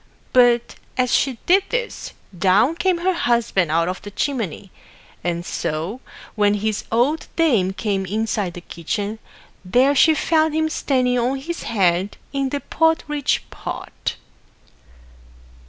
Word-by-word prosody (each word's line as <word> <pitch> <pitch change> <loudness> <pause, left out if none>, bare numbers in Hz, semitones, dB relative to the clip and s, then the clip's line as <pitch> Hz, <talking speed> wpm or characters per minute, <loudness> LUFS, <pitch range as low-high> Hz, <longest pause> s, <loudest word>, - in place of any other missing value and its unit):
But, 240 -2 +4 0.2
as 250 -1 +1
she 265 -3 +2
did 385 +2 +4
this, - - -3 0.2
down 195 - +3
came 350 +1 +1
her 370 +2 +1
Husband 235 - +1
out 165 +2 +2
of 185 +1 -4
the 205 - -8
chimney; 205 - -3 0.5
and 175 0 -2
so, 165 +11 -3 0.3
when 205 -1 +2
his 215 0 -2
old 255 +8 +1
dame 235 - +3
came 195 -2 -2
inside 210 -3 -1
the 175 - -7
kitchen, 205 +6 -4 0.4
there 250 +9 +3
she 315 +3 +5
found 315 0 +2
him 315 0 +1
standing 250 -4 +1
on 250 +3 0
his 335 +6 -5
head 190 -2 +1 0.2
in 275 -1 0
the 285 +1 -3
porridge 305 -3 +1
pot. - - -5
235 Hz, 135 wpm, -21 LUFS, 195-295 Hz, 0.5 s, she